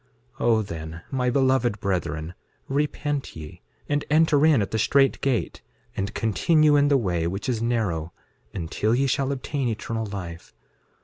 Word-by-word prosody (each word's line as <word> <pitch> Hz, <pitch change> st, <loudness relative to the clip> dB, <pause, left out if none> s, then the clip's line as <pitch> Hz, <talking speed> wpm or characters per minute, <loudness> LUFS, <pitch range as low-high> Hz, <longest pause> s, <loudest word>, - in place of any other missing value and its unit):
6:11 -, -, -1 dB
O 115 Hz, -2 st, +4 dB
then, 80 Hz, -3 st, -7 dB
my 125 Hz, -2 st, 0 dB
beloved 130 Hz, -4 st, +2 dB
brethren, 85 Hz, -4 st, -2 dB, 0.3 s
repent 145 Hz, 0 st, -2 dB
ye, 75 Hz, -1 st, -10 dB, 0.3 s
and 145 Hz, 0 st, 0 dB
enter 155 Hz, -1 st, +4 dB
in 155 Hz, -6 st, +5 dB
at 100 Hz, -, -2 dB
the 110 Hz, -, 0 dB
strait 135 Hz, +5 st, +3 dB
gate, 135 Hz, -4 st, -1 dB, 0.3 s
and 100 Hz, +2 st, -3 dB
continue 150 Hz, -, +3 dB
in 145 Hz, 0 st, +4 dB
the 145 Hz, -1 st, +4 dB
way 90 Hz, -8 st, 0 dB
which 95 Hz, +4 st, -4 dB
is 120 Hz, -3 st, -1 dB
narrow, 100 Hz, -9 st, -1 dB, 0.4 s
until 100 Hz, +5 st, -1 dB
ye 135 Hz, +2 st, +2 dB
shall 135 Hz, +1 st, 0 dB
obtain 135 Hz, 0 st, -2 dB
eternal 115 Hz, 0 st, -3 dB
life. 90 Hz, -4 st, -8 dB
115 Hz, 160 wpm, -25 LUFS, 95-140 Hz, 0.4 s, in